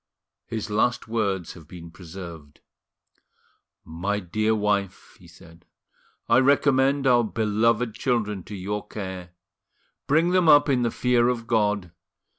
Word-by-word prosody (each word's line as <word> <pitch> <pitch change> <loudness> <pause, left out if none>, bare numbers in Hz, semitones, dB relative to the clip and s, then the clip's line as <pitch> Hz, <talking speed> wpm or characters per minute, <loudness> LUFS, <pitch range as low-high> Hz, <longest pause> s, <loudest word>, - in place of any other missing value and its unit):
His 110 -2 -5
last 120 +4 0
words 100 -6 -2
have 80 -4 -15
been 85 -1 -11
preserved. 85 -4 -11 1.2
"My 95 +6 -3
dear 110 +4 0
wife," 100 -2 -2
he 90 - -17
said, 85 0 -17 0.6
"I - - +5
recommend 135 0 +3
our 120 -2 +4
beloved 110 +1 0
children 105 -6 -1
to 105 - -8
your 105 +2 -5
care: 95 -4 -7 0.8
bring 160 +5 +3
them 180 -3 +3
up 145 0 +6
in 130 -3 +2
the 120 - +1
fear 120 0 +1
of 120 -2 -3
God. 105 -5 0
105 Hz, 130 wpm, -24 LUFS, 95-120 Hz, 1.2 s, up